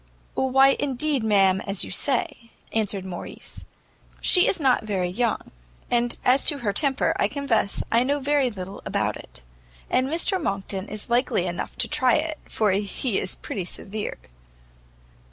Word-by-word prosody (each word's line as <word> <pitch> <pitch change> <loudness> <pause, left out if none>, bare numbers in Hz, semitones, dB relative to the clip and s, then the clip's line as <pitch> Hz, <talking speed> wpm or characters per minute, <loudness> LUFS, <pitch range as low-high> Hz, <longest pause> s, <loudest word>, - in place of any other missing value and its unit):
"Why 270 +1 +4
indeed, 285 -1 0
ma'am, 195 -3 +3
as 195 -1 0
you - - -8
say," 240 -3 0 0.2
answered 205 -3 -1
Morrice, 180 -2 -8 0.5
"she 365 -1 +6
is 375 - +1
not 260 -5 +3
very 190 -4 -1
young; 230 +4 -1 0.4
and 240 0 +1
as 260 +2 +4
to 295 - +3
her 220 -7 -2
temper, 275 +4 +1
I - - +3
confess 255 -7 0
I 230 - +4
know 285 +3 +1
very 280 -1 +2
little 190 -2 -8
about - - -1
it; - - -12 0.5
and 255 +1 +2
Mr 345 +4 +1
Monckton 195 -4 -3
is 215 +2 -4
likely 240 -7 +2
enough 175 0 -4
to - - +1
try 255 -2 +3
it, 310 0 -1
for 215 -3 +1
he 200 +3 -1
is 185 - -3
pretty 195 - -5
severe." 205 +4 -5
235 Hz, 155 wpm, -24 LUFS, 195-275 Hz, 0.5 s, she